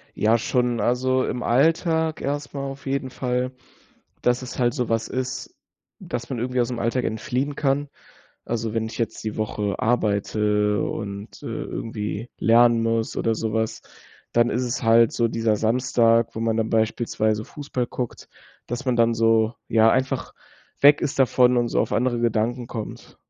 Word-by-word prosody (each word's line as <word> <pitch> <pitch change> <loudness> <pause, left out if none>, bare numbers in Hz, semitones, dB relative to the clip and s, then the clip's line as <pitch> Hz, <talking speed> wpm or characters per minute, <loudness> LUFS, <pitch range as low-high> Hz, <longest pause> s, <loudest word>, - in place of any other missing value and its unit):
Ja, 110 +2 +3
schon. 120 0 0
Also 130 +1 +1
im 125 - -3
Alltag 160 +5 +2
erst 145 +1 -3
mal 140 - -4
auf 135 0 -7
jeden 135 -1 -2
Fall, 125 0 -2 0.7
dass 125 +1 +2
es 130 - -8
halt 120 -2 +2
so 125 -5 -2
was 115 -1 0
ist, 130 0 -4 0.4
dass 120 +1 -6
man 130 - -3
irgendwie 125 +2 -1
ausm 120 0 -3
Alltag 115 +2 0
entfliehen 130 +6 -2
kann. 140 0 0 0.6
Also, 115 -1 -3
wenn 115 -1 0
ich 110 - -8
jetzt 115 -2 -3
die 110 - -3
Woche 105 -2 -2
arbeite 105 -2 +1
und, 100 -1 -6
äh, - - -7
irgendwie 110 0 -4
lernen 115 0 +5
muss 115 0 -1
oder 115 0 +1
so 110 0 -3
was, 110 0 -1 0.5
dann 120 0 +3
ist 125 +2 0
es 120 - -3
halt 115 0 +5
so 120 - +1
dieser 115 -1 +1
Samstag, 115 0 +2
wo 110 - -4
man 115 -1 0
dann 110 0 0
beispielsweise 110 -1 0
Fußball 140 -3 -4
guckt, 125 0 -6 0.4
dass 120 +4 -4
man 125 -2 +1
dann 115 0 +3
so 115 0 +3
ja, 115 0 +5
einfach 130 +1 -1 0.5
weg 145 +1 +7
ist 140 - -2
davon 125 -1 +4
und 120 -1 +2
so - - +1
auf - - -1
andere 120 -1 +1
Gedanken 120 +1 0
kommt. 110 -3 -8
120 Hz, 170 wpm, -23 LUFS, 110-125 Hz, 0.7 s, weg